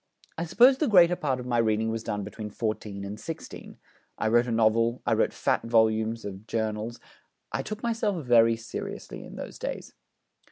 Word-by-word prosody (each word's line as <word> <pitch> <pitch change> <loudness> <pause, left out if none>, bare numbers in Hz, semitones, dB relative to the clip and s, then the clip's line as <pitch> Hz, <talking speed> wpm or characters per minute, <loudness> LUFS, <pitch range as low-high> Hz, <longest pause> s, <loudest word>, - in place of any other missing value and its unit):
I 170 - -3
suppose 245 +10 +5
the 305 - +2
greater 180 -5 +6
part 135 -6 -1
of 125 - -7
my 120 -1 +1
reading 110 0 +1
was 115 0 -3
done 105 -2 -3
between 105 +1 -7
fourteen 105 -2 -4
and 100 +2 -7
sixteen. 165 - -8 0.4
I 110 - 0
wrote 120 +2 +3
a - - -2
novel, 115 +2 +2
I - - +2
wrote - - +2
fat - - 0
volumes 110 -1 +1
of 100 +2 -8
journals: 110 +1 -3 0.5
I - - -1
took 215 +1 -6
myself 215 - -1
very 115 -1 +5
seriously 115 +1 -7
in - - -11
those - - -8
days.' - - -5
115 Hz, 185 wpm, -27 LUFS, 110-150 Hz, 0.5 s, greater